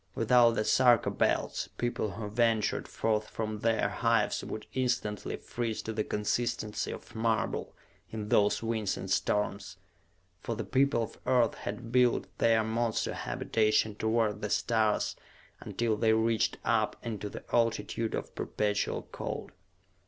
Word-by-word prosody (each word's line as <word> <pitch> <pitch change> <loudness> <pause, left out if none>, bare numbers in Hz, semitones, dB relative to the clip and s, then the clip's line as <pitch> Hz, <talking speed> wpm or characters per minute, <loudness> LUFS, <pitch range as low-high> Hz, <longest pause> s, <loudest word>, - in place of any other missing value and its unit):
Without 115 0 +5
the 110 - 0
Sarka 125 -3 +4
Belts, - - 0
people 120 -4 -1
who 110 -1 -5
ventured 115 0 +1
forth 110 -1 -1
from 110 -1 -4
their 110 -2 +2
hives 115 +1 +1
would 110 - -6
instantly 125 -5 -1
freeze 115 -2 -4
to 110 - -4
the 110 0 0
consistency 110 +1 -1
of - - -9
marble 110 0 -1 0.3
in 105 -1 -5
those 105 +2 +3
winds 110 -4 -1
and - - -6
storms. 100 -2 0 0.6
For 115 - -4
the 115 - -3
people 130 +3 +2
of 115 - -8
Earth 125 -3 +3
had 115 +3 -6
built 125 -1 +3
their 115 -1 +4
monster 110 0 -1
habitation 110 -1 +1
toward 110 0 0
the 105 - -2
stars 110 -1 +1 0.4
until 115 -2 -1
they 110 +1 +3
reached 110 0 +1
up - - +2
into 105 -3 -4
the - - -8
altitude 115 -1 +1
of - - -5
perpetual 105 -1 -1
cold. - - -5
110 Hz, 140 wpm, -30 LUFS, 105-115 Hz, 0.6 s, Without